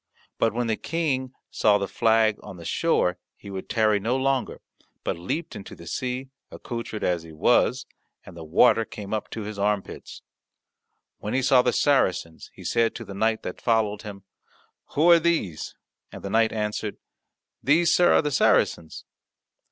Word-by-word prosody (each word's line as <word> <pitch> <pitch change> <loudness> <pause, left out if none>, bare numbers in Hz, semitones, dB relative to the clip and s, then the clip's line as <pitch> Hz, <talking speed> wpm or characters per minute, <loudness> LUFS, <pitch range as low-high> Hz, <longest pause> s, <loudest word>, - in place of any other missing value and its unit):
But 115 - +3
when 120 +2 -2
the 110 -2 -1
King 140 -6 -2 0.2
saw 105 -1 +3
the 100 -1 -3
flag 110 -1 +2
on 95 - -10
the 85 - -11
shore 90 - +1 0.2
he 100 - -11
would 95 -1 -7
tarry 110 -2 +2
no 115 +6 0
longer, 135 -1 -1 0.4
but - - -1
leapt 150 - -4
into 95 - -9
the 85 - -13
sea, 125 +8 -4 0.2
accoutred 115 -3 -6
as 90 -2 0
he 80 0 -12
was, 80 - +2 0.4
and 95 - -12
the 85 - -8
water 95 +8 +4
came 105 -1 -8
up 110 - -3
to 110 - -6
his 105 0 -7
armpits. 100 -1 -3 1.0
When 105 - -3
he 130 - +1
saw 130 -1 +5
the 125 - +1
Saracens, 95 - +1
he - - -12
said 115 -1 +1
to - - -7
the 100 - -8
knight 110 +3 0
that 90 - -6
followed 110 -3 +1
him, 100 -3 -9 0.7
"Who 165 +4 +5
are 170 - +8
these?" 160 - -1 0.4
And - - -10
the 100 - -5
knight 110 +1 +3
answered, 105 -1 -3 0.6
"These, 165 +5 +3
sir, 175 - +5
are - - +4
the 150 - -1
Saracens." 85 - +1
110 Hz, 175 wpm, -25 LUFS, 100-130 Hz, 1.0 s, are